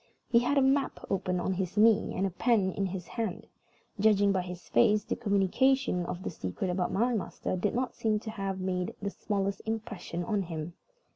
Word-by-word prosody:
He 235 - +7
had 280 +4 +1
a 275 - +5
map 270 +1 +1
open 185 -2 0
on 190 - 0
his 185 +1 -3
knee, 215 0 +4
and 190 - +1
a 195 - -1
pen 200 0 +2
in 195 +1 -1
his 180 -1 -5
hand. 220 0 -4 0.5
Judging 205 -1 +4
by 190 -1 +1
his 180 0 -8
face, 210 -1 +4
the - - -2
communication 205 -1 +2
of 180 - -5
the - - -3
secret 155 - -3
about 180 0 -1
my 240 +5 +2
master 205 -3 -2
did 195 +4 -1
not 250 0 -1
seem 215 -1 0
to 220 - -5
have 195 -2 -3
made 180 -1 -2
the 200 -1 -3
smallest 200 -1 -2
impression 220 -6 -4
on 205 +2 0
him. 165 -2 -5
195 Hz, 200 wpm, -30 LUFS, 180-220 Hz, 0.5 s, He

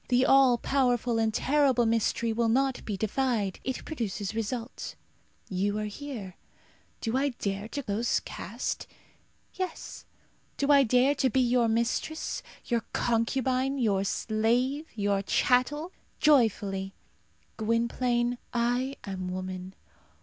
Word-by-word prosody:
The 250 +1 +3
all 265 -3 +6
powerful 245 -3 +1
and 220 -1 +2
terrible 265 0 +3
mystery 230 0 +1
will 230 0 +1
not 265 +2 +1
be 205 -3 -3
defied. 220 -2 0
It 260 -1 -4
produces 220 - -3
result. 225 +2 -4 0.5
You 200 +2 -1
are 215 - -2
here. 210 -4 -7 0.6
Do 225 +1 -1
I 280 +2 +2
dare 200 +1 -3
to 285 +4 -5
lose 215 +4 +1
caste? - - -5 0.7
Yes. 370 -1 -5 0.5
Do 280 +1 +2
I 280 -1 +7
dare 255 +2 +4
to 265 -2 +1
be 260 - +1
your 245 -1 +3
mistress 235 +8 -1 0.2
your 235 -2 0
concubine 255 +3 +1
your 205 -6 +2
slave 240 +9 0
your 200 -2 +1
chattel? 270 - +1 0.3
Joyfully. 205 -9 +2 0.6
Gwynplaine, 240 +2 0
I 245 +3 0
am 190 -2 -4
woman. 185 0 -5
235 Hz, 120 wpm, -28 LUFS, 215-260 Hz, 0.7 s, I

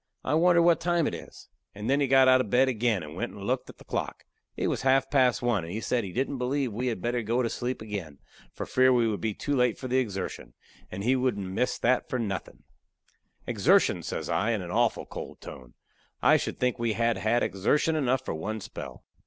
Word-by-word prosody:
I 140 - -1
wonder 170 +1 +5
what 170 -1 +4
time 175 -2 +1
it - - -1
is!" - - -10 0.3
And 105 +2 -5
then 140 +2 +2
he 140 - +2
got 135 0 +5
out 130 0 +6
of 110 - -5
bed 130 +4 +4
again 115 -6 0
and 75 0 -9
went - - -4
and - - -9
looked - - -2
at - - -12
the - - -15
clock. - - -4 0.3
It - - -1
was - - -1
half 135 +1 +2
past 130 -3 +3
one, 120 -7 +1
and 85 - -7
he 105 - -3
said 120 +1 -1
he 95 - -6
"didn't 135 +4 -2
believe 130 -1 -1
we 125 +4 -2
had 115 -6 -3
better 120 0 0
go 115 +3 0
to 115 - -1
sleep 125 -2 -3
again, 95 -9 -6 0.3
for - - -6
fear 130 0 +4
we 120 -2 +3
would 105 -5 -2
be 110 -2 -2
too 145 - -2
late 125 -3 +2
for 130 - -6
the 130 +1 +2
exertion, 95 - -4 0.4
and 100 - -5
he 125 +4 +3
wouldn't 125 -6 0
miss 125 +6 0
that 125 +1 +1
for 130 - -1
nothin'." 100 -6 -5 0.8
"Exertion!" - - +3
says - - -4
I, 105 +8 +1
in 105 -4 -2
a 85 - -7
awful 115 +4 +1
cold - - -8
tone. - - -11 0.4
"I - - +5
should - - -2
think 125 -1 0
we 115 -2 0
had 115 +1 +1
had 115 +3 +1
exertion 150 - +1
enough 130 -3 0
for - - -3
one 105 +8 -4
spell." 65 -9 -9
120 Hz, 235 wpm, -27 LUFS, 105-130 Hz, 0.8 s, out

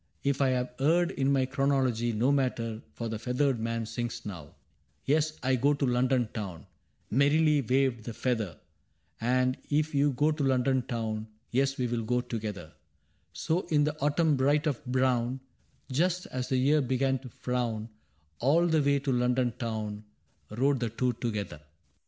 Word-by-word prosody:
If 140 0 +1
I 135 - +4
have 125 -1 -1
erred 170 +5 +3
in 135 -5 0
my 135 -2 +3
chronology, 130 -3 +1
No 115 +5 +2
matter, 120 -5 -1
— 75 - -34
for 115 - -4
the 110 -1 -4
feathered 125 +2 0
man 115 0 -2
sings 115 +1 -4
now: 85 -8 -8 0.5
Tes^ 155 +2 +2
I 130 0 +3
go 140 +4 +2
to 140 - 0
London 125 -1 +2
Town 95 -8 -6 0.2
' - - -16
{Aferrily 150 +3 +4
waved 130 -4 +1
the 120 - -4
feather)^ 110 - -2 0.4
* - - -35 0.2
And 130 0 0
if 150 +1 +1
you 140 0 +3
go 150 +4 +2
to 150 -1 -2
London 130 0 +2
Town^ 110 -3 -3 0.3
TeSj 135 +2 +1
we 125 - 0
*ll 115 - -1
go 125 +3 +1
together, 105 -9 -5 0.3
* - - -42
So 170 +4 0
in 150 -2 +3
the 150 +1 0
autumn 150 +1 +2
bright 145 +4 +2
and 145 -6 -1
brown, 130 0 +1 0.6
fust 180 +4 +1
as 125 -1 -3
the 130 - +2
year 145 +4 +3
began 130 +1 +1
tofrown^ 120 -3 -3 0.5
All 155 +8 +3
the 160 -2 +3
way 140 0 +3
to 140 0 -2
London 125 0 +1
Town 110 -3 -4 0.5
Rode 135 +5 +1
the 120 -1 -1
two 125 +3 0
together. 105 -9 -4
130 Hz, 175 wpm, -29 LUFS, 115-140 Hz, 0.6 s, I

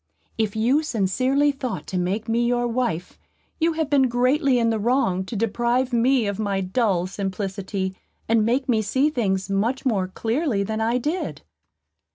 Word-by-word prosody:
If 220 -2 -1
you 245 +7 +3
sincerely 260 +3 +1
thought 265 -3 -5
to 185 - -4
make 195 +5 -2
me 230 +1 +1
your 240 0 +1
wife, 230 -8 -2 0.4
you 330 0 +2
have 320 -1 -1
been 275 -2 +3
greatly 255 +3 +2
in 230 -1 +2
the 220 - -1
wrong 205 -5 +1
to 225 - -6
deprive 240 +4 0
me 245 0 +3
of 200 0 -3
my 200 -2 0
dull 190 -2 +1
simplicity, 190 0 -3 0.3
and 225 -1 +3
make 250 +5 +1
me 225 -4 +2
see 260 +8 +1
things 195 -8 -1
much 220 +8 -1
more 200 -7 +1
clearly 225 - -1
than 220 +2 -3
I 230 +2 +1
did." 300 - -3
230 Hz, 170 wpm, -23 LUFS, 200-260 Hz, 0.4 s, you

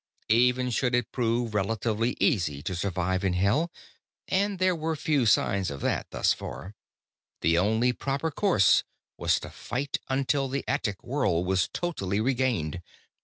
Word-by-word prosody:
Even 125 +2 +3
should 125 +1 +1
it 120 -2 -1
prove 120 -2 0
relatively 110 +3 0
easy 75 - +1
to 95 - -3
survive 95 +1 -1
in 95 -2 +1
Hell 105 - +1 0.6
and 200 +1 +1
there 185 0 +2
were 160 0 -2
few 145 -5 +1
signs 100 -2 +2
of 70 -1 -7
that, - - -1
thus - - +2
far 95 - -8 0.7
the 85 - +3
only 110 +7 +2
proper 140 +6 -2
course 160 - +4 0.3
was - - +1
to - - -9
fight 135 +3 -3
until 135 +1 +1
the 135 +1 -3
attic 105 -8 -2
world 105 - 0
was 95 -1 +1
totally 100 - -2
regained. 115 - 0
120 Hz, 150 wpm, -27 LUFS, 95-135 Hz, 0.7 s, course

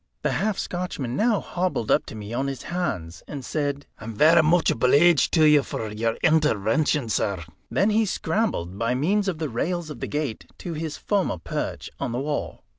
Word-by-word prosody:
The - - +1
half 210 +1 0
Scotchman 165 -9 -3
now 215 - +2
hobbled 175 -11 -2
up - - +3
to - - -8
me 105 +1 -7
on 135 +3 -1
his 135 -2 -5
hands, 115 - -3
and 140 -4 -6
said: 145 -2 -2
"I'm 115 -1 -7
varra 160 +8 +6
much 165 +2 +3
obleeged 140 +6 +4
to 160 - +5
you 150 -1 +6
for 110 -5 -5
your 115 +2 -1
intervention, 150 -2 +2
sir." 100 -4 -1 0.3
Then 205 +2 +2
he 220 0 +2
scrambled, 160 - -1
by 115 +2 +1
means 195 +10 +1
of 185 -4 -1
the 155 0 -2
rails 165 +6 -2
of - - -8
the - - -3
gate, 145 -7 -3
to 170 - -6
his 155 -1 -4
former 200 - 0
perch 80 - -4
on 130 -4 -2
the 120 - -1
wall. 145 +2 -3
150 Hz, 190 wpm, -24 LUFS, 115-175 Hz, 0.3 s, varra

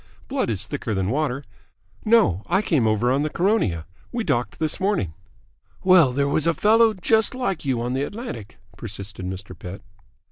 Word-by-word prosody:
Blood - - -1
is - - -2
thicker 110 - -3
than 95 +1 0
water. 140 -1 -1 0.6
No, 215 - +4
I 200 - +2
came 145 - +2
over 110 +3 +2
on 135 +2 +2
the 155 - 0
Caronia. 170 - +1 0.3
We 240 -2 -2
docked 120 - -1
this 155 +1 -2
morning." 190 - 0 0.7
"Well, 185 -8 +6
there 140 +2 +1
was 150 +2 +1
a 170 - +3
fellow 220 +1 +4
just 220 +5 +2
like 195 - -2
you 130 -3 0
on 125 +1 -2
the 135 - 0
Atlantic," 145 - -6 0.2
persisted 100 -3 -6
Mr. 95 0 -6
Pett. 90 +3 -8
Mrs. 105 -1 -30
140 Hz, 180 wpm, -23 LUFS, -, 0.7 s, Well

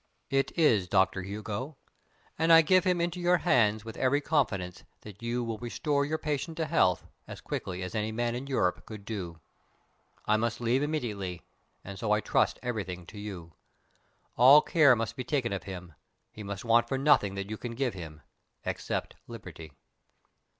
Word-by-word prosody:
"It 135 0 +1
is, 115 - +4
Doctor 95 0 +2
Hugo; 110 +8 -5 0.6
and 165 +1 +2
I 165 0 +9
give 185 +4 +4
him 180 -1 +2
into 175 +1 -1
your 175 +1 +3
hands 110 - +2
with 110 0 -8
every 135 +2 +2
confidence 110 - -1 0.2
that 105 0 -12
you 120 +1 -2
will 115 -2 -4
restore 140 +4 -1
your 155 +2 -1
patient 155 +1 -3
to 160 - 0
health 90 - +2 0.2
as - - -8
quickly 90 0 -5
as 90 - -6
any 110 0 -1
man 120 +1 -1
in 125 +3 -5
Europe 110 -10 0
could 105 -2 -9
do. 90 -7 -5 0.9
I 110 - +3
must 115 +1 -1
leave 120 +3 +1
immediately, 105 - -3 0.4
and 100 0 -8
so 105 0 -1
I 105 - +3
trust - - +1
everything 95 -7 -4
to 105 +4 -11
you. 90 -6 -8 0.8
All 135 +5 +8
care 145 -6 +5
must 115 0 -3
be 130 - -4
taken 125 -6 -1
of 95 - -4
him. 90 -3 -8 0.4
He 110 - -10
must 100 +1 -6
want 120 +1 +4
for 135 - -1
nothing 130 -9 +3
that 100 +1 -5
you 110 - -3
can 115 0 -6
give 130 -1 -1
him 80 -5 -9 0.4
except - - -3
liberty." 90 -9 -10
115 Hz, 180 wpm, -29 LUFS, 100-140 Hz, 0.9 s, I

